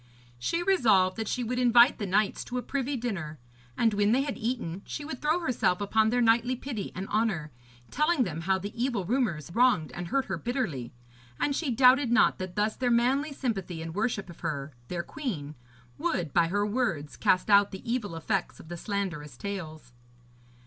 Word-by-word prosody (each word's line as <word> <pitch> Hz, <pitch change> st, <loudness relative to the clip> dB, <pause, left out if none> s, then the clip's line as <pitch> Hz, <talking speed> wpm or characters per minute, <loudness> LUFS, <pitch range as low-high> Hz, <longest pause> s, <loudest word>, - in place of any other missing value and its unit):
She 335 Hz, -, -1 dB
resolved 220 Hz, -, +3 dB
that 220 Hz, -1 st, -3 dB
she 250 Hz, -, -1 dB
would 250 Hz, +2 st, -2 dB
invite 245 Hz, 0 st, +5 dB
the 205 Hz, -, -2 dB
knights 200 Hz, +2 st, +1 dB
to 250 Hz, -, -4 dB
a 250 Hz, -, -2 dB
privy 280 Hz, 0 st, -2 dB
dinner, 190 Hz, -11 st, -4 dB, 0.4 s
and 225 Hz, -2 st, +3 dB
when 205 Hz, +1 st, +3 dB
they 265 Hz, +2 st, +3 dB
had 285 Hz, -2 st, -3 dB
eaten 220 Hz, -7 st, -3 dB
she 290 Hz, -, -6 dB
would 280 Hz, -4 st, -6 dB
throw 310 Hz, +4 st, +1 dB
herself 240 Hz, -, +1 dB
upon 215 Hz, +2 st, +2 dB
their 245 Hz, +2 st, +1 dB
knightly 235 Hz, +2 st, +3 dB
pity 240 Hz, -5 st, -5 dB
and 190 Hz, +1 st, -4 dB
honour, 205 Hz, -9 st, 0 dB, 0.4 s
telling 300 Hz, -2 st, +2 dB
them 165 Hz, -6 st, -4 dB
how 190 Hz, +2 st, +1 dB
the 200 Hz, +2 st, -6 dB
evil 235 Hz, -5 st, -1 dB
rumours 185 Hz, -, -1 dB
wronged 235 Hz, -, +3 dB
and 175 Hz, 0 st, -6 dB
hurt 270 Hz, +7 st, 0 dB
her -, -, -4 dB
bitterly. 205 Hz, -, -3 dB, 0.5 s
And 285 Hz, -, +1 dB
she 310 Hz, -2 st, -1 dB
doubted 255 Hz, +1 st, +5 dB
not 240 Hz, -1 st, +4 dB
that 185 Hz, -1 st, -5 dB
thus 210 Hz, +1 st, +1 dB
their 250 Hz, -1 st, 0 dB
manly 260 Hz, +5 st, +2 dB
sympathy 195 Hz, -11 st, -3 dB
and 165 Hz, 0 st, -6 dB
worship 210 Hz, 0 st, -1 dB
of 170 Hz, -, -12 dB
her, 150 Hz, -3 st, -4 dB
their 175 Hz, -1 st, -3 dB
queen, 175 Hz, -, -5 dB, 0.5 s
would, 165 Hz, -6 st, -1 dB
by 170 Hz, -1 st, +4 dB
her 205 Hz, +4 st, 0 dB
words, 205 Hz, -, -1 dB
cast 185 Hz, +3 st, +2 dB
out 200 Hz, 0 st, +6 dB
the 190 Hz, -, -9 dB
evil 230 Hz, -7 st, -2 dB
effects 165 Hz, -, -2 dB
of 160 Hz, -, -13 dB
the 175 Hz, -, -5 dB
slanderous 170 Hz, -, -4 dB
tales. 155 Hz, -10 st, -6 dB
215 Hz, 190 wpm, -28 LUFS, 175-250 Hz, 0.5 s, out